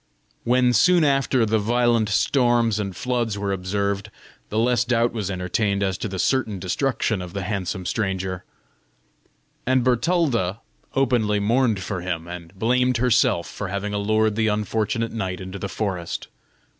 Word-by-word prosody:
When, 125 +1 +3
soon 175 +6 +5
after, 135 -4 +2
the 110 0 +1
violent 120 0 +2
storms 120 -1 +2
and 100 -3 -3
floods 120 -3 -1
were 100 -1 -2
observed, 100 +2 -2 0.4
the 110 - -3
less 120 +1 +3
doubt 120 -1 +1
was 105 -4 -3
entertained 100 +2 -1
as 95 -1 0
to - - -2
the 95 -2 -5
certain 110 -1 0
destruction 105 +2 -1
of 90 -1 -8
the 100 -1 -3
handsome 95 -2 -3
stranger; 95 -4 -2 1.2
and 130 -1 +3
Bertalda 125 - +1 0.3
openly 120 -6 +2
mourned 115 -1 +2
for 95 -2 -4
him 85 -2 -4
and 85 -1 -8
blamed 125 +3 +2
herself 115 -7 +2
for 100 - -5
having 100 +2 -3
allured 110 +1 +1
the 110 0 +1
unfortunate 110 +3 -1
knight 95 -5 -3
into 95 +1 -7
the 100 - -4
forest. 95 -6 -3
110 Hz, 150 wpm, -23 LUFS, 95-120 Hz, 1.2 s, soon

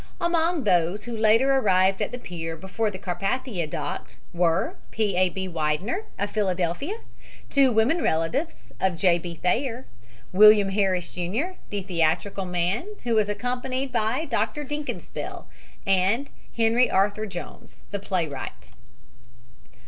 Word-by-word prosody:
Among 340 -2 +1
those 180 0 +2
who 240 +1 -5
later 225 +5 +4
arrived 190 -6 +3
at - - -1
the 245 - -4
pier 165 -7 -6
before 190 +6 -2
the 195 - -7
Carpathia 195 - -2
docked 145 -1 -5 0.2
were 170 0 +1
P. 210 -4 0
A. 185 0 +3
B. 190 +1 -4
Widener, 170 - -1
of 205 +1 -2
Philadelphia, 190 - -1 0.6
two 275 -2 +5
women 235 +10 +3
relatives 165 - -1
of 185 -3 +1
J. 175 -1 +4
B. 170 0 -6
Thayer, 240 - -1 0.5
William 210 0 +7
Harris, 190 -3 0
Jr., 205 - -2 0.2
the 205 -2 -3
theatrical 180 +2 0
man, 180 - -1 0.2
who 240 -1 0
was 215 -2 +3
accompanied 255 +4 -2
by 240 +6 0
Dr 230 +1 -1
Dinkelspiel, 295 +1 -5 0.4
and 195 +8 +2 0.3
Henry 230 +2 +4
Arthur 205 +3 +1
Jones, 175 -3 -9
the 200 - -2
playwright. 165 - -4
205 Hz, 135 wpm, -25 LUFS, 180-245 Hz, 0.6 s, William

